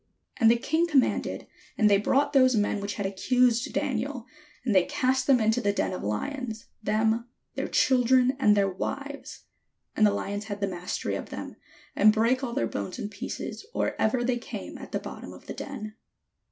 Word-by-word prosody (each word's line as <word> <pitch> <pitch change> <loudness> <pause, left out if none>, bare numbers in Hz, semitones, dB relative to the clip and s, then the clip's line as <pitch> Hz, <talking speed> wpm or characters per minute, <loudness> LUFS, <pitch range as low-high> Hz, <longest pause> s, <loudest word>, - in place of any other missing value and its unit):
And 225 -4 +5
the 235 - +5
king 320 +7 +1
commanded, 285 -6 +1 0.3
and 215 - +4
they 200 -1 +5
brought 280 +8 +2
those 255 -2 +5
men 205 -1 +1
which 200 +1 -4
had 205 - -3
accused 240 +4 +2
Daniel, 255 0 -2 0.4
and 230 - +1
they 185 -2 +5
cast 260 0 0
them 265 -3 +5
into 220 +2 +2
the 205 -2 +2
den 200 - -1
of - - -5
lions, 225 - -4 0.2
them, 220 +2 +1 0.3
their - - -3
children, 255 -1 +3
and 210 -5 +4
their 200 -1 +3
wives; 275 +9 -5 0.5
and 220 - +2
the 205 -1 +5
Hons 205 +1 -4
had 205 -1 -5
the 200 - +1
mastery 180 -1 -3
of - - -4
them, - - -7 0.4
and 215 - +6
brake 230 +5 +2
all 240 -3 -3
their 115 - 0
bones 100 -3 -4
in 205 - -4
pieces 205 - -6
or - - 0
ever 240 +3 +2
they 240 0 0
came - - -7
at - - -10
the - - 0
bottom - - -8
of - - -14
the - - -6
den. 215 -7 -7
230 Hz, 195 wpm, -27 LUFS, 205-255 Hz, 0.5 s, and